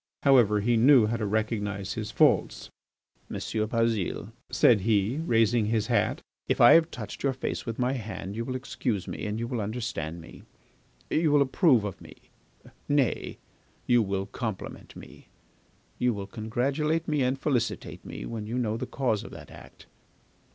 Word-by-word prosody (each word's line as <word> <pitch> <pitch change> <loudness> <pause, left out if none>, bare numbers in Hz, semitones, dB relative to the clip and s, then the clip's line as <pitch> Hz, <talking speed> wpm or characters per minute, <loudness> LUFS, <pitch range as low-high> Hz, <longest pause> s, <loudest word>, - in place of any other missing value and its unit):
However, 120 -7 +5
he 120 +2 +2
knew 125 0 +6
how 115 +2 -1
to 110 -2 -2
recognise 105 -2 -2
his 110 -2 -4
faults. - - +2 0.6
"M. - - -6
Bazile," 110 -2 -1 0.2
said 110 -5 +4
he, 105 +4 +1
raising 115 -7 +2
his 110 -1 +1
hat, - - +1 0.2
"if - - 0
I - - +8
have 165 0 +5
touched - - -8
your 135 -1 +1
face 130 - -4
with 115 - -4
my 125 +1 +1
hand 105 -5 -6
you 115 - -2
will 130 +2 -4
excuse 120 -6 -3
me - - -5
and 105 +1 -3
you 115 - -2
will 120 -2 -3
understand 100 -7 -4
me, 80 - -13 0.7
you 155 -1 +2
will 145 -1 +5
approve 130 - +3
of 100 -3 -6
me, - - -13 0.7
nay, 145 -4 0 0.5
you 120 -1 +4
will 100 -2 -2
compliment 110 -2 -6
me, - - -13 0.7
you 125 -2 +1
will 100 -1 -5
congratulate 135 +10 -1
me 150 -3 +1
and 130 +1 +1
felicitate 130 -6 -2
me, - - -7
when 110 -2 -5
you 120 +3 -3
know 110 -3 -1
the - - -5
cause 120 -6 -1
of - - -9
that - - -12
act. - - -14
115 Hz, 170 wpm, -27 LUFS, 105-130 Hz, 0.7 s, I